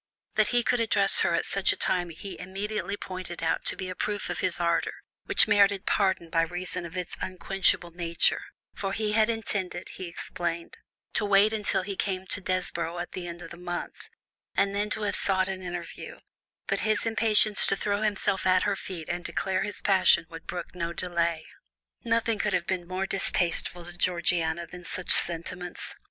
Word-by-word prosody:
That -, -, +3 dB
he 245 Hz, -1 st, +2 dB
could 245 Hz, 0 st, +1 dB
address 210 Hz, -3 st, +4 dB
her 170 Hz, -, +3 dB
at -, -, 0 dB
such 195 Hz, -1 st, +3 dB
a -, -, -2 dB
time 175 Hz, -1 st, 0 dB
he 180 Hz, +4 st, -8 dB
immediately 200 Hz, +2 st, -3 dB
pointed 185 Hz, -3 st, -6 dB
out 160 Hz, -, 0 dB
to -, -, +5 dB
be 190 Hz, -, -5 dB
a 185 Hz, -, -4 dB
proof 205 Hz, +2 st, -2 dB
of -, -, -3 dB
his 180 Hz, -, 0 dB
ardour, 170 Hz, -1 st, +1 dB, 0.3 s
which -, -, +5 dB
merited 200 Hz, -2 st, +4 dB
pardon 190 Hz, -5 st, +1 dB
by 165 Hz, -, +3 dB
reason 175 Hz, +1 st, -1 dB
of 170 Hz, +2 st, -9 dB
its 180 Hz, -2 st, -2 dB
unquenchable 185 Hz, -1 st, +1 dB
nature, 170 Hz, -1 st, +1 dB, 0.3 s
for 195 Hz, -1 st, -3 dB
he 215 Hz, 0 st, -1 dB
had 215 Hz, +1 st, +3 dB
intended, 200 Hz, -6 st, -2 dB
he 185 Hz, -, -7 dB
explained, 170 Hz, 0 st, -4 dB, 0.4 s
to -, -, 0 dB
wait 205 Hz, +1 st, +4 dB
until 205 Hz, -3 st, 0 dB
he 200 Hz, +1 st, -4 dB
came 190 Hz, -1 st, -2 dB
to 200 Hz, -, +2 dB
Desborough 175 Hz, -2 st, -2 dB
at 175 Hz, 0 st, -5 dB
the 180 Hz, -1 st, -5 dB
end 170 Hz, 0 st, -7 dB
of -, -, -10 dB
the 170 Hz, -, -9 dB
month, 175 Hz, 0 st, -6 dB, 0.5 s
and 200 Hz, 0 st, +2 dB
then 205 Hz, +1 st, -1 dB
to 215 Hz, -, -2 dB
have 205 Hz, -, 0 dB
sought 190 Hz, -1 st, +3 dB
an 190 Hz, -1 st, -4 dB
interview, 175 Hz, -2 st, -7 dB, 0.5 s
but -, -, 0 dB
his 215 Hz, 0 st, +1 dB
impatience 220 Hz, -2 st, +3 dB
to -, -, +3 dB
throw 205 Hz, +1 st, -1 dB
himself 200 Hz, -3 st, +1 dB
at 185 Hz, 0 st, +4 dB
her 200 Hz, 0 st, +1 dB
feet 180 Hz, -4 st, -7 dB
and 175 Hz, 0 st, -3 dB
declare 190 Hz, +1 st, -1 dB
his 205 Hz, -, -3 dB
passion 190 Hz, -3 st, +4 dB
would 165 Hz, 0 st, -10 dB
brook 175 Hz, -1 st, -5 dB
no 170 Hz, -1 st, -3 dB
delay. 170 Hz, -2 st, -1 dB, 0.6 s
Nothing 230 Hz, -2 st, +1 dB
could 210 Hz, -1 st, 0 dB
have 175 Hz, -1 st, +1 dB
been 180 Hz, -2 st, -2 dB
more 185 Hz, +1 st, -2 dB
distasteful 175 Hz, -2 st, 0 dB
to 175 Hz, -, -10 dB
Georgiana 170 Hz, -2 st, 0 dB
than 180 Hz, +1 st, -11 dB
such 175 Hz, +1 st, 0 dB
sentiments. 175 Hz, +1 st, +2 dB
185 Hz, 190 wpm, -27 LUFS, 175-200 Hz, 0.6 s, to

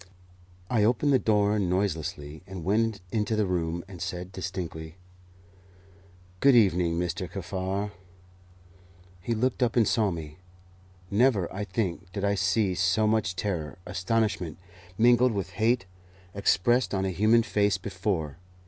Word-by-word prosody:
I 110 Hz, -1 st, +2 dB
opened 125 Hz, +6 st, +2 dB
the 130 Hz, -, +5 dB
door 105 Hz, -1 st, +2 dB
noiselessly 85 Hz, -5 st, -2 dB
and 95 Hz, -3 st, -7 dB
went 110 Hz, +1 st, +1 dB
into 110 Hz, 0 st, 0 dB
the 110 Hz, -1 st, +1 dB
room, 85 Hz, -2 st, -2 dB
and 90 Hz, -4 st, -10 dB
said 90 Hz, +1 st, -5 dB
distinctly, 90 Hz, -4 st, -6 dB, 1.4 s
"Good 140 Hz, +3 st, +5 dB
evening, 90 Hz, -6 st, +3 dB
Mr. 90 Hz, +1 st, -2 dB
Kaffar." 95 Hz, +2 st, -3 dB, 1.3 s
He 115 Hz, +6 st, -1 dB
looked 125 Hz, +3 st, 0 dB
up 120 Hz, -1 st, +2 dB
and 115 Hz, -3 st, +4 dB
saw 110 Hz, -4 st, +2 dB
me. 80 Hz, -2 st, -7 dB, 0.7 s
Never, 105 Hz, -4 st, +2 dB
I 105 Hz, +2 st, -3 dB
think, 95 Hz, -3 st, -3 dB
did 100 Hz, +1 st, -2 dB
I 100 Hz, -, +2 dB
see 95 Hz, 0 st, +1 dB
so 95 Hz, +4 st, +2 dB
much 105 Hz, -3 st, +1 dB
terror, 90 Hz, -6 st, -3 dB
astonishment, 95 Hz, -4 st, -1 dB, 0.4 s
mingled 120 Hz, +1 st, +5 dB
with 100 Hz, -3 st, -3 dB
hate, 115 Hz, -1 st, +1 dB, 0.5 s
expressed 105 Hz, +4 st, +2 dB
on 95 Hz, 0 st, 0 dB
a 95 Hz, -, -1 dB
human 110 Hz, +5 st, +4 dB
face 105 Hz, -3 st, +1 dB
before. 95 Hz, -6 st, -3 dB
100 Hz, 135 wpm, -27 LUFS, 90-110 Hz, 1.4 s, the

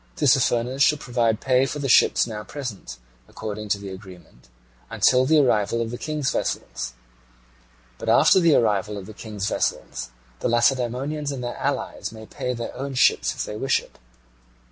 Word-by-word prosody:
Tissaphernes 130 Hz, -2 st, +2 dB
shall 150 Hz, +2 st, +5 dB
provide 120 Hz, -5 st, 0 dB
pay 130 Hz, 0 st, +2 dB
for 150 Hz, -, -4 dB
the 140 Hz, -1 st, -2 dB
ships -, -, +5 dB
now 110 Hz, -2 st, -6 dB
present, 115 Hz, -, -7 dB, 0.3 s
according 105 Hz, 0 st, -6 dB
to 100 Hz, -, +2 dB
the 100 Hz, -1 st, -8 dB
agreement, 90 Hz, -, -13 dB, 0.4 s
until 130 Hz, 0 st, +3 dB
the 160 Hz, -, +4 dB
arrival 115 Hz, -5 st, +2 dB
of 115 Hz, -1 st, -2 dB
the 120 Hz, -, -5 dB
King's 150 Hz, -3 st, -2 dB
vessels: -, -, -3 dB, 1.1 s
but -, -, -3 dB
after -, -, +6 dB
the 170 Hz, -4 st, +4 dB
arrival 105 Hz, -2 st, +1 dB
of 100 Hz, -, -7 dB
the 110 Hz, -, -10 dB
King's 105 Hz, -2 st, -5 dB
vessels 65 Hz, -10 st, -2 dB, 0.3 s
the -, -, -1 dB
Lacedaemonians 130 Hz, +5 st, 0 dB
and 130 Hz, -3 st, -5 dB
their 120 Hz, -, -4 dB
allies 140 Hz, -4 st, -3 dB
may 110 Hz, -1 st, -10 dB
pay 125 Hz, -, -4 dB
their 115 Hz, 0 st, -6 dB
own 135 Hz, 0 st, -5 dB
ships -, -, +3 dB
if -, -, -3 dB
they 105 Hz, -, -6 dB
wish 135 Hz, -, +1 dB
it. -, -, -17 dB
120 Hz, 170 wpm, -23 LUFS, 105-135 Hz, 1.1 s, after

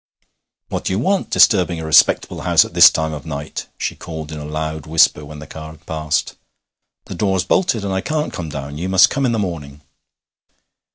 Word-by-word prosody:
'What -, -, -4 dB
do -, -, -1 dB
you -, -, 0 dB
want 190 Hz, -, 0 dB
disturbing 90 Hz, -5 st, +3 dB
a 80 Hz, -, -6 dB
respectable 80 Hz, -, +3 dB
house -, -, +4 dB
at -, -, -11 dB
this -, -, +9 dB
time 80 Hz, 0 st, -2 dB
of 75 Hz, -2 st, -7 dB
night?' 75 Hz, -1 st, -6 dB
she -, -, -3 dB
called 80 Hz, -2 st, -8 dB
in 75 Hz, -, -6 dB
a 75 Hz, -, -7 dB
loud 80 Hz, 0 st, -5 dB
whisper 75 Hz, -1 st, +3 dB
when 75 Hz, +1 st, -10 dB
the 75 Hz, -, -10 dB
car 80 Hz, +1 st, -10 dB
had 75 Hz, -1 st, -21 dB
passed. 80 Hz, -1 st, -2 dB, 0.7 s
'The -, -, -8 dB
door's 95 Hz, -3 st, 0 dB
bolted, 120 Hz, -, 0 dB
and 95 Hz, -, -2 dB
I 95 Hz, -, -1 dB
can't 155 Hz, +4 st, -3 dB
come 85 Hz, -2 st, -5 dB
down. 70 Hz, 0 st, -7 dB
You 90 Hz, +3 st, -3 dB
must 95 Hz, -1 st, +5 dB
come 140 Hz, -2 st, 0 dB
in -, -, 0 dB
the 115 Hz, -, -1 dB
morning.' 75 Hz, -8 st, -5 dB
80 Hz, 210 wpm, -19 LUFS, 75-95 Hz, 0.7 s, this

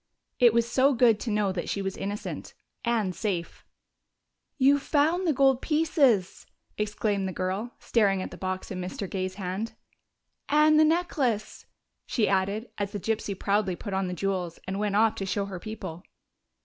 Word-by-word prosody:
It 240 Hz, -2 st, +7 dB
was 235 Hz, +1 st, +2 dB
so 265 Hz, +3 st, +3 dB
good 230 Hz, -3 st, +4 dB
to 240 Hz, -, -4 dB
know 210 Hz, -2 st, +1 dB
that 180 Hz, -2 st, -4 dB
she -, -, -1 dB
was 195 Hz, -1 st, -3 dB
innocent 205 Hz, +1 st, -5 dB, 0.3 s
and 225 Hz, -6 st, 0 dB
safe! 180 Hz, -3 st, -3 dB, 0.9 s
"You've 280 Hz, +1 st, +4 dB
found 320 Hz, +6 st, +2 dB
the -, -, +4 dB
gold 270 Hz, -2 st, +3 dB
pieces!" 290 Hz, -, +2 dB, 0.3 s
exclaimed 210 Hz, -2 st, -1 dB
the -, -, -3 dB
girl, 190 Hz, +6 st, -3 dB
staring 200 Hz, -4 st, +2 dB
at 185 Hz, -, -5 dB
the -, -, -8 dB
box 185 Hz, 0 st, -4 dB
in 185 Hz, -1 st, -4 dB
Mr. 185 Hz, +2 st, -4 dB
Gay's 185 Hz, 0 st, -3 dB
hand. 195 Hz, +3 st, -4 dB, 0.8 s
"And 305 Hz, +1 st, +5 dB
the 310 Hz, -, +7 dB
necklace!" 295 Hz, -10 st, 0 dB, 0.4 s
she 220 Hz, -4 st, +1 dB
added, 200 Hz, +4 st, 0 dB
as 205 Hz, +1 st, -2 dB
the 205 Hz, -, -3 dB
gypsy 210 Hz, -1 st, -2 dB
proudly 200 Hz, -2 st, +1 dB
put 200 Hz, +2 st, -6 dB
on 190 Hz, 0 st, 0 dB
the 180 Hz, -, -3 dB
jewels 180 Hz, -3 st, -2 dB
and 190 Hz, +2 st, -3 dB
went 205 Hz, -1 st, 0 dB
off 220 Hz, +1 st, +4 dB
to 195 Hz, -, -3 dB
show 200 Hz, +1 st, -1 dB
her 190 Hz, -2 st, -6 dB
people. 190 Hz, -4 st, -7 dB
210 Hz, 175 wpm, -27 LUFS, 190-245 Hz, 0.9 s, It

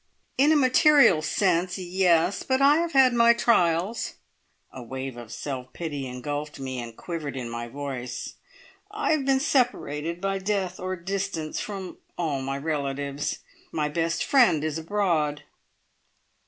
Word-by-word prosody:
"In 285 Hz, +3 st, +4 dB
a -, -, +5 dB
material 275 Hz, -, +5 dB
sense 180 Hz, +3 st, +1 dB
yes! 180 Hz, 0 st, +2 dB
But 260 Hz, 0 st, 0 dB
I 280 Hz, +2 st, +6 dB
have 335 Hz, 0 st, -1 dB
had 265 Hz, -2 st, +6 dB
my 235 Hz, 0 st, +6 dB
trials." 190 Hz, -2 st, +1 dB, 0.6 s
A 130 Hz, -, -8 dB
wave 130 Hz, +2 st, -6 dB
of 120 Hz, -2 st, -10 dB
self 130 Hz, -3 st, -6 dB
pity 145 Hz, -5 st, -4 dB
engulfed 145 Hz, +4 st, -5 dB
me 130 Hz, -1 st, -4 dB
and 115 Hz, -1 st, -8 dB
quivered 155 Hz, -6 st, -5 dB
in 125 Hz, -2 st, -4 dB
my 120 Hz, 0 st, -5 dB
voice. 125 Hz, -2 st, -6 dB, 0.6 s
"I 420 Hz, -3 st, -1 dB
have 305 Hz, -4 st, +1 dB
been 270 Hz, -1 st, +3 dB
separated, 175 Hz, -, 0 dB
by 195 Hz, +1 st, -1 dB
death 190 Hz, -2 st, -2 dB
or 185 Hz, +1 st, -3 dB
distance, 185 Hz, -3 st, -3 dB
from 195 Hz, -3 st, -6 dB, 0.2 s
all 150 Hz, -6 st, -1 dB
my 135 Hz, +1 st, -3 dB
relatives. 140 Hz, -1 st, -3 dB, 0.3 s
My 150 Hz, -2 st, -1 dB
best 165 Hz, +2 st, -1 dB
friend 230 Hz, -, +4 dB
is 155 Hz, 0 st, -2 dB
abroad." 160 Hz, -5 st, 0 dB
165 Hz, 145 wpm, -26 LUFS, 140-205 Hz, 0.6 s, I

